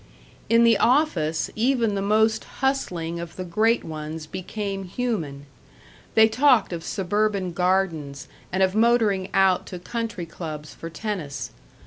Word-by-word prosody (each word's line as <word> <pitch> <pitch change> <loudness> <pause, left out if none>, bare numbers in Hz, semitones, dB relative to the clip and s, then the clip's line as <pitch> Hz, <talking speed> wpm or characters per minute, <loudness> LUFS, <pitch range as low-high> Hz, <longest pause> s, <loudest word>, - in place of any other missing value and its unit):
In 230 0 +5
the 230 -2 +5
office 210 - +2
even 235 -1 +2
the 200 - -1
most 220 +2 +2
hustling 175 -12 -2
of 170 -1 -7
the 185 - -4
great 220 +6 +2
ones 155 0 -6
became 195 +3 -5
human. 175 - -3 0.7
They 220 0 +7
talked 250 -4 +3
of 165 -1 -5
suburban 200 0 -1
gardens 170 -6 -1 0.2
and 190 +1 +2
of 190 0 +2
motoring 215 -4 +2
out 190 -1 +3
to 180 - -6
country 225 0 -4
clubs 155 -3 -7
for 165 - -8
tennis. 165 -7 -5
190 Hz, 135 wpm, -24 LUFS, 165-220 Hz, 0.7 s, They